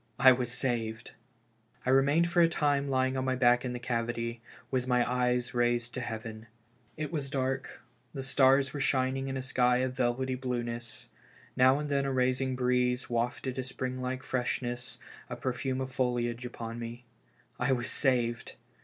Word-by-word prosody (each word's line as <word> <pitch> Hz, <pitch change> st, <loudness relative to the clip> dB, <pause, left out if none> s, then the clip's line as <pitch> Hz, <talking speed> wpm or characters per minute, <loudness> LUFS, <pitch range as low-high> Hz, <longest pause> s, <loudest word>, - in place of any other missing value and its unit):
I 130 Hz, -, +8 dB
was 125 Hz, -1 st, 0 dB
saved! 115 Hz, -3 st, -2 dB, 0.7 s
I 130 Hz, -, +2 dB
remained 145 Hz, +6 st, +4 dB
for 175 Hz, -1 st, +4 dB
a 165 Hz, -, +7 dB
time 145 Hz, -3 st, +1 dB
lying 130 Hz, 0 st, +1 dB
on 130 Hz, -, -1 dB
my 130 Hz, 0 st, 0 dB
back 125 Hz, -1 st, +4 dB
in 125 Hz, -1 st, -3 dB
the -, -, -3 dB
cavity, 115 Hz, -1 st, -2 dB, 0.3 s
with 130 Hz, -1 st, 0 dB
my 125 Hz, -1 st, +3 dB
eyes 125 Hz, 0 st, 0 dB
raised 120 Hz, 0 st, +1 dB
to 130 Hz, -, -3 dB
heaven. 110 Hz, -1 st, -6 dB, 0.5 s
It 155 Hz, 0 st, -3 dB
was 145 Hz, -5 st, -3 dB
dark, 135 Hz, -1 st, -2 dB, 0.3 s
the 135 Hz, -3 st, -5 dB
stars 135 Hz, 0 st, +4 dB
were 145 Hz, -, -4 dB
shining 135 Hz, 0 st, +1 dB
in 135 Hz, 0 st, -3 dB
a 130 Hz, -, -4 dB
sky 125 Hz, -2 st, +3 dB
of 130 Hz, 0 st, 0 dB
velvety 130 Hz, +1 st, 0 dB
blueness. 120 Hz, -2 st, -4 dB, 0.5 s
Now 130 Hz, +2 st, +5 dB
and 150 Hz, 0 st, -3 dB
then 140 Hz, -1 st, +1 dB
the 135 Hz, -, 0 dB
rising 130 Hz, 0 st, +1 dB
breeze 125 Hz, 0 st, +1 dB
wafted 125 Hz, +2 st, -1 dB
a -, -, -1 dB
spring 130 Hz, 0 st, -4 dB
like 130 Hz, +1 st, -3 dB
freshness, 120 Hz, -1 st, -2 dB, 0.3 s
a -, -, -4 dB
perfume 130 Hz, +1 st, -2 dB
of 130 Hz, 0 st, -4 dB
foilage 120 Hz, -1 st, -1 dB
upon 115 Hz, -1 st, -6 dB
me. 120 Hz, +1 st, -7 dB, 0.5 s
I 125 Hz, +2 st, +1 dB
was 125 Hz, -1 st, 0 dB
saved 120 Hz, -4 st, 0 dB
125 Hz, 170 wpm, -30 LUFS, 120-130 Hz, 0.7 s, I